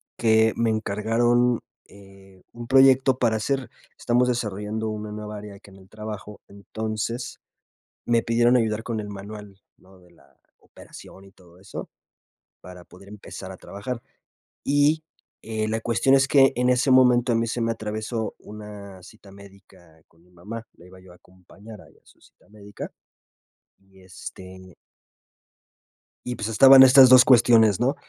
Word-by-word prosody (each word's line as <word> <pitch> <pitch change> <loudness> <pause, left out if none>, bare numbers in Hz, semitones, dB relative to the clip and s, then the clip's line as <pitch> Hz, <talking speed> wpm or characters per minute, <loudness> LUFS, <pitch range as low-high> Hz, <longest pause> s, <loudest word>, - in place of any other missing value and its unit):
que 110 -1 +2
me 115 -1 0
encargaron, 115 +3 0 0.3
eh, 95 -1 -19
un 120 0 -10
proyecto 135 0 +4
para 115 -3 0
hacer. 135 +4 -3 0.3
Estamos 125 +1 +1
desarrollando 110 -2 -3
una 105 0 -6
nueva 105 0 -8
área 105 -1 -11
aquí 100 0 -18
en 95 - -17
el 95 -1 -19
trabajo, 105 -1 -9
entonces, 110 +4 -6 0.7
me 115 -1 +1
pidieron 120 +2 +2
ayudar 110 -2 -1
con 115 -2 -4
el 105 - -8
manual, 100 0 -11 0.2
¿no?, 95 0 -21
de 90 -1 -23
la 70 -5 -26 0.2
operación 95 - -16
y 95 - -18
todo 90 -2 -22
eso, 95 +1 -9 0.7
para 90 0 -13
poder 100 +2 -17
empezar 100 -2 -10
a 95 - -11
trabajar. 115 +4 -8 0.7
Y, 145 +3 +2 0.4
eh, 110 -1 -4
la 110 +1 -2
cuestión 120 +4 +2
es 135 -1 +2
que 135 -1 +4
en 125 +1 +1
ese 125 +2 +1
momento 125 -1 +4
a - - +1
mí 115 0 -1
se 120 +1 -4
me 115 0 -1
atravesó 110 0 -5
una 105 -2 -12
cita 105 0 -17
médica 95 -5 -19
con 85 +1 -29
mi 90 - -27
mamá, 110 +6 -9
la 85 - -18
iba 95 +1 -16
yo 90 -1 -17
a - - -17
acompañar 95 +5 -16
ahí - - -22
a - - -48
su - - -25
cita - - -26
médica, 105 -1 -11 0.9
y, 95 0 -24
este 95 0 -12 1.5
y, 125 - -4
pues, 105 -1 -5
estaban 135 +4 +8
estas 130 0 +7
2 130 0 +7
cuestiones, 115 -5 +4
¿no? 130 +4 0
110 Hz, 160 wpm, -23 LUFS, 100-120 Hz, 1.5 s, estaban